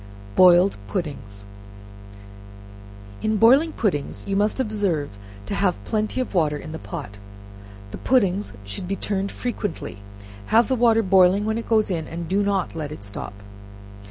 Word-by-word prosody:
Boiling 180 +1 +6
Puddings. 105 - -5 1.8
In 215 0 0
boiling 270 +10 +5
puddings, 180 - -2
you 195 - -2
must 210 +5 +1
observe 200 - -1 0.3
to - - -4
have 195 -2 0
plenty 215 +2 -1
of 255 - -3
water 155 -5 +1
in 155 - -9
the 160 - -6
pot; 120 - -8 0.7
the - - -7
pudding 205 -6 +2 0.2
should 100 - -5
be 195 - -1
turned 195 -1 -2
frequently, 205 - -4 0.5
have 230 +2 +4
the 260 - +2
water 230 -2 +4
boiling 190 +1 +4
when 220 +1 -1
it 230 - -8
goes 215 -3 +2
in, 160 -3 -2
and 170 0 -6
do 195 +4 +1
not 200 -2 0
let 150 -3 -5
it 125 - -9
stop. 100 0 -8
195 Hz, 155 wpm, -23 LUFS, 155-215 Hz, 1.8 s, Boiling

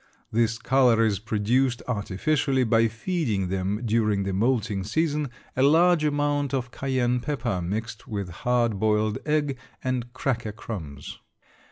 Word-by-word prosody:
This 115 0 +1
color 120 -2 +3
is 100 -4 +1
produced 115 +4 0
artificially 130 +5 0
by 115 -1 +3
feeding 110 - -2
them 95 +4 -2
during 105 -3 +1
the 95 0 -2
moulting 110 -2 0
season 150 - 0 0.3
a 130 - +1
large 165 +4 +5
amount 145 -1 +1
of 125 -2 -3
cayenne 125 -2 0
pepper 120 -8 -2
mixed 110 +6 -4
with 100 -4 -4
hard 120 +2 0
boiled 105 0 +1
egg 145 -3 0 0.2
and 125 -2 -2
cracker 120 -4 -2
crumbs. 80 -11 -7
115 Hz, 135 wpm, -25 LUFS, 105-135 Hz, 0.3 s, large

